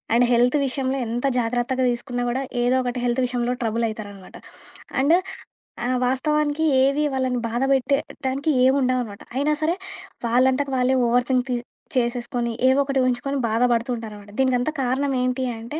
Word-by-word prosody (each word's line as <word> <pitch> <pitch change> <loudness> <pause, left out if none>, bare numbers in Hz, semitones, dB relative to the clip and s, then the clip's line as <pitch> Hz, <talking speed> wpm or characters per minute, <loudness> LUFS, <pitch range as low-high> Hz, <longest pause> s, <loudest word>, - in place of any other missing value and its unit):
And 245 +1 +5
health 245 +4 +4
విషయంలో 265 +1 -1
ఎంత 240 +4 -2
జాగ్రత్తగా 245 +2 0
దీసుకున్నా 245 0 -3
గూడా, 260 +3 -1 0.2
ఏదో 250 +1 +3
ఒకటి 245 0 -3
హెల్త్ 240 +2 +1
విషయంలో 245 0 -1
ట్రబుల్ 230 0 0
అయితారనమాట. 205 -3 -9 0.6
అండ్ 315 +5 +5 0.7
ఆ - - -1 0.2
వాస్తవానికి 300 +4 0 0.2
ఏవి 275 +2 +2
వాళ్ళను 255 -2 0
బాధపెట్టడానికి 270 +3 0 0.2
ఎం 265 +1 +4
ఉండవు 255 0 +1
అనమాట. 205 -3 -10
అయినా 290 +3 +1
సరే! 330 +3 +1 0.5
వాళ్ళంతకు 260 +4 +2
వాళ్ళే 255 +1 +2
ఓవర్ 245 +1 +2
థింక్ 255 -1 +2
తి 245 - +1 0.4
చేసేసుకొని, 240 0 -1 0.2
ఏవో 265 +2 +3
ఒకటి 270 -1 0
ఉహించుకొని, 260 +3 -1
బాధబడుతూ 235 +1 +1
ఉంటారనమాట. 210 -2 -9
దీనికంతా 260 +3 +1
కారణం 270 +2 0
ఏంటి 255 +1 -1
అంటే, 265 +8 -6
250 Hz, 150 wpm, -23 LUFS, 240-270 Hz, 0.7 s, అండ్